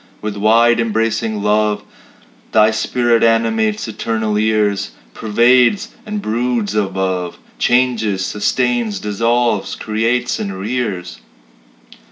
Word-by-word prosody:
With 105 Hz, -1 st, -4 dB
wide 115 Hz, +3 st, +3 dB
embracing 110 Hz, -1 st, -1 dB
love 105 Hz, 0 st, +1 dB, 0.7 s
Thy 110 Hz, 0 st, +5 dB
spirit 115 Hz, +1 st, +1 dB
animates 110 Hz, -2 st, +1 dB
eternal 110 Hz, -1 st, -2 dB
years 105 Hz, -, 0 dB, 0.2 s
Pervades 125 Hz, -, +3 dB, 0.2 s
and 210 Hz, -1 st, -4 dB
broods 115 Hz, -2 st, -1 dB
above, 95 Hz, -3 st, -2 dB, 0.2 s
Changes, 115 Hz, -6 st, +1 dB
sustains, 115 Hz, +1 st, -1 dB
dissolves, 115 Hz, +1 st, 0 dB
creates, 115 Hz, +3 st, -1 dB
and 100 Hz, -2 st, -4 dB
rears. 105 Hz, -4 st, -4 dB
110 Hz, 95 wpm, -17 LUFS, 105-120 Hz, 0.7 s, Thy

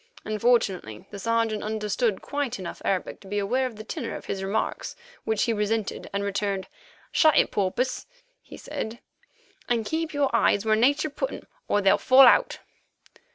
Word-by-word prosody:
Unfortunately 210 Hz, -, 0 dB
the 200 Hz, -, -7 dB
Sergeant 230 Hz, 0 st, 0 dB
understood 215 Hz, 0 st, -1 dB
quite 285 Hz, -4 st, -2 dB
enough 185 Hz, -3 st, -7 dB
Arabic 190 Hz, -2 st, -1 dB
to 195 Hz, -, -15 dB
be 205 Hz, +2 st, -3 dB
aware 245 Hz, +6 st, +1 dB
of 240 Hz, -, -9 dB
the 215 Hz, -, -8 dB
tenor -, -, -5 dB
of -, -, -8 dB
his 195 Hz, -1 st, -4 dB
remarks, 195 Hz, +3 st, -2 dB, 0.3 s
which 220 Hz, -2 st, +1 dB
he 230 Hz, -, +1 dB
resented 210 Hz, 0 st, -2 dB
and 200 Hz, 0 st, -2 dB
returned: 200 Hz, -1 st, -2 dB, 0.4 s
"Shut 310 Hz, -2 st, +4 dB
it, -, -, +4 dB
Porpoise," 235 Hz, +6 st, -1 dB, 0.3 s
he -, -, -12 dB
said, 225 Hz, +2 st, -6 dB, 0.7 s
"and 230 Hz, -2 st, +1 dB
keep 320 Hz, +5 st, -2 dB
your 285 Hz, -4 st, 0 dB
eyes 205 Hz, -2 st, +3 dB
where 215 Hz, 0 st, +4 dB
Nature 280 Hz, +6 st, +2 dB
put -, -, -3 dB
'em, -, -, -8 dB, 0.2 s
or 205 Hz, -, +2 dB
they'll 195 Hz, -1 st, +4 dB
fall 260 Hz, +1 st, +7 dB
out." 245 Hz, -, +4 dB
220 Hz, 170 wpm, -26 LUFS, 200-245 Hz, 0.7 s, fall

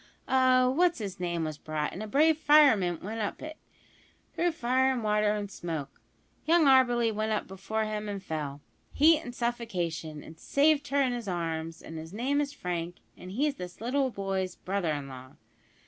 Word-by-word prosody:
A 255 Hz, -1 st, +4 dB
what's 340 Hz, +5 st, +2 dB
'is 200 Hz, -3 st, -5 dB
name 170 Hz, -2 st, -2 dB
was 155 Hz, -2 st, -4 dB
brought, 155 Hz, -1 st, -3 dB
and 190 Hz, -, -6 dB
a 215 Hz, -, -5 dB
brave 310 Hz, +8 st, +4 dB
fireman 280 Hz, -, +4 dB
went 220 Hz, +3 st, -4 dB
up 205 Hz, -, -3 dB
it, 310 Hz, 0 st, -7 dB, 0.8 s
through 345 Hz, -1 st, 0 dB
fire 260 Hz, -2 st, +2 dB
and 250 Hz, -3 st, -2 dB
water 210 Hz, 0 st, +2 dB
and 205 Hz, -1 st, -4 dB
smoke. 160 Hz, -7 st, -6 dB, 0.4 s
Young 330 Hz, 0 st, +4 dB
Auberly 245 Hz, -4 st, +4 dB
went 215 Hz, +1 st, -1 dB
up 210 Hz, -, -1 dB
before 195 Hz, +4 st, -3 dB
him 215 Hz, -1 st, -4 dB
and 200 Hz, -2 st, -5 dB
fell 150 Hz, -4 st, -4 dB, 0.3 s
heat 315 Hz, +2 st, +5 dB
and 245 Hz, 0 st, -8 dB
suffocation 175 Hz, -11 st, -3 dB
and 160 Hz, +1 st, -13 dB
saved 290 Hz, -, +2 dB
her 280 Hz, 0 st, +2 dB
in 255 Hz, -2 st, 0 dB
his 240 Hz, -3 st, -5 dB
arms, 165 Hz, -2 st, -3 dB
and 160 Hz, 0 st, -7 dB
his 160 Hz, +3 st, -9 dB
name 270 Hz, +7 st, 0 dB
is 285 Hz, -1 st, -2 dB
Frank, 175 Hz, -8 st, -4 dB, 0.2 s
and 180 Hz, -, -11 dB
he's 285 Hz, +5 st, 0 dB
this 180 Hz, 0 st, -8 dB
boy's 200 Hz, -7 st, -1 dB
brother 190 Hz, -4 st, -2 dB
in 145 Hz, -2 st, -3 dB
law!" 130 Hz, -1 st, -11 dB
210 Hz, 180 wpm, -29 LUFS, 175-260 Hz, 0.8 s, heat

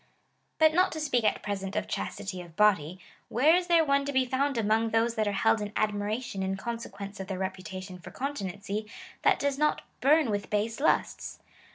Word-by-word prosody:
^ -, -, -34 dB, 0.5 s
But 315 Hz, -1 st, +5 dB
not 365 Hz, +3 st, +3 dB
to 315 Hz, -, -4 dB
speak 275 Hz, -6 st, +1 dB
at -, -, +1 dB
present 195 Hz, -1 st, -4 dB
of 210 Hz, -, -1 dB
chastity 185 Hz, -2 st, -4 dB
of 170 Hz, -2 st, -13 dB
body, 185 Hz, -5 st, +3 dB, 0.3 s
where 295 Hz, +8 st, +5 dB
is 360 Hz, 0 st, 0 dB
there 335 Hz, -2 st, +5 dB
one 280 Hz, -1 st, +2 dB
to 285 Hz, -, -2 dB
be 260 Hz, -1 st, +2 dB
found 265 Hz, +1 st, 0 dB
among 225 Hz, +1 st, +2 dB
those 225 Hz, +1 st, +2 dB
that 215 Hz, -2 st, 0 dB
are -, -, +1 dB
held 215 Hz, +2 st, +2 dB
in 205 Hz, 0 st, -4 dB
admiration 210 Hz, +1 st, -1 dB
in 190 Hz, 0 st, -1 dB
consequence 205 Hz, -3 st, -6 dB
of 190 Hz, -, -5 dB
their 190 Hz, -1 st, -3 dB
reputation 185 Hz, 0 st, -5 dB
for -, -, -10 dB
continency, 205 Hz, -5 st, -4 dB, 0.3 s
that -, -, +4 dB
does 280 Hz, -1 st, -1 dB
not 300 Hz, 0 st, +1 dB, 0.2 s
burn 290 Hz, -2 st, +4 dB
with 205 Hz, -1 st, -2 dB
base 220 Hz, +3 st, -1 dB
lusts 300 Hz, -, 0 dB
215 Hz, 200 wpm, -29 LUFS, 195-275 Hz, 0.5 s, But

